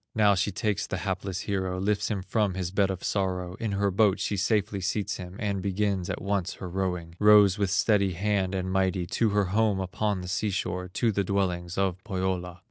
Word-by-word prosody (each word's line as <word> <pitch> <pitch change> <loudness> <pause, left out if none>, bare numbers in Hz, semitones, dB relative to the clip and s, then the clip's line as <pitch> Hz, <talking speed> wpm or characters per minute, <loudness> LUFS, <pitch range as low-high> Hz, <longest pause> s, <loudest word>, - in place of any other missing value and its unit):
Now 105 -2 +5
she 95 +1 +1
takes 105 +1 -1
the 95 - -3
hapless 95 -1 -2
hero, 95 -2 -2
Lifts 105 +1 0
him 100 -4 -2
from 105 -2 0
his 90 -2 -3
bed 100 0 +2
of 95 -1 -4
sorrow, 90 -2 -1
In 110 -3 -2
her 100 0 +1
boat 100 0 +3
she 105 - -1
safely 100 0 0
seats 100 +2 -1
him, 90 0 -8
And 100 -3 -2
begins 100 -1 -1
at - - -3
once 100 -2 -1
her 95 - -7
rowing, 90 -2 -3
Rows 105 -2 +6
with 100 -2 +1
steady 100 0 +2
hand 95 0 0
and 95 0 -2
mighty 95 -1 +1
To 110 +5 +1
her 105 -1 +2
home 105 -2 +2
upon 95 +1 -1
the 90 - -7
sea 95 +4 -1
shore, 90 -1 -2
To 115 +5 0
the 100 -1 0
dwellings 90 -3 -1
of 95 -1 0
Pohyola. 90 -3 -3
95 Hz, 210 wpm, -27 LUFS, 90-105 Hz, -, Rows